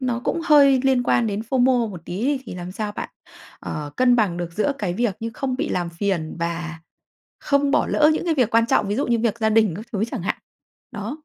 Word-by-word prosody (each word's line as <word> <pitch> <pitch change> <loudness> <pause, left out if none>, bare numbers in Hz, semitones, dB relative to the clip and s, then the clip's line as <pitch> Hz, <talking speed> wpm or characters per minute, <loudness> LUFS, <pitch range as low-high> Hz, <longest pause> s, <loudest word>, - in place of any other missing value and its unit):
nó 245 -2 -1
cũng 335 - -1
hơi 280 -4 +6
liên 260 -2 +3
quan 240 -1 +2
đến 205 0 -2
FOMO 250 -3 +3
một 180 - -8
tí 195 +7 -4
đi, 280 -1 +1
thì - - -7
làm 180 0 -7
sao 210 +1 -4
bạn, - - -5 0.5
ờ, 150 -1 -5
cân 250 -1 +4
bằng 200 -7 +1
được 175 -1 -5
giữa 215 +10 0
cái 185 -4 -2
việc 220 -2 0
như 230 0 -3
không 260 -2 -2
bị 310 +3 -2
làm 175 -1 -1
phiền 170 -3 -2
và 170 -1 -4 0.6
không 280 0 +1
bỏ - - +2
lỡ 300 0 +4
những - - -3
cái 330 -2 +1
việc 250 -6 +2
quan 230 0 +4
trọng? 205 - +2
Ví 205 - 0
dụ 280 - 0
như 235 -1 +2
việc 230 0 0
gia 220 -1 +2
đình 215 -6 +3
các 215 +4 -8
thứ 205 0 0
chẳng 245 -9 -4
hạn. 190 - -1 0.6
Đó. 225 +9 -5
225 Hz, 245 wpm, -22 LUFS, 185-260 Hz, 0.6 s, hơi